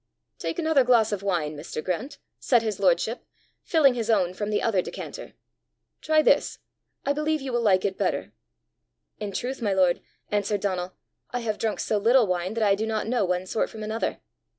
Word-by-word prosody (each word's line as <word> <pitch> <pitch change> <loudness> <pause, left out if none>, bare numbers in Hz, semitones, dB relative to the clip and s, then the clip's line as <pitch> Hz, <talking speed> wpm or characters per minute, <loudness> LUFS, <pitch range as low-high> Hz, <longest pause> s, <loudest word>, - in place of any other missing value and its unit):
"Take - - -3
another 315 -5 +3
glass 235 -3 +4
of 205 -2 -2
wine, 170 -6 -1
Mr. 150 +1 -6
Grant," 255 - -3 0.2
said 240 -3 +3
his 215 -2 -2
lordship, - - +1 0.4
filling 295 -6 +4
his 235 -2 -3
own 185 -5 +2
from 205 +2 -3
the 210 - +1
other 200 -5 +1
decanter. - - -8 0.7
"Try 310 0 +3
this; - - +3 0.5
I 280 - +2
believe 305 +1 0
you 270 -2 -5
will 240 - +1
like 195 -5 +3
it 195 -1 -2
better." - - -1 0.9
"In 210 -1 -4
truth, 250 +6 -4
my 205 -4 +1
lord," 185 -2 +3 0.3
answered 205 0 0
Donal, 185 -2 -2 0.4
"I 245 - -3
have 215 -2 -2
drunk 220 -2 -1
so 210 - 0
little 235 +3 +5
wine 185 +2 -2
that 230 - 0
I 200 -2 +4
do 215 +3 -1
not 220 -1 -1
know 235 -3 +1
one 180 0 -1
sort 200 - -1
from 220 -1 -8
another." 220 +2 -2
215 Hz, 195 wpm, -26 LUFS, 190-245 Hz, 0.9 s, little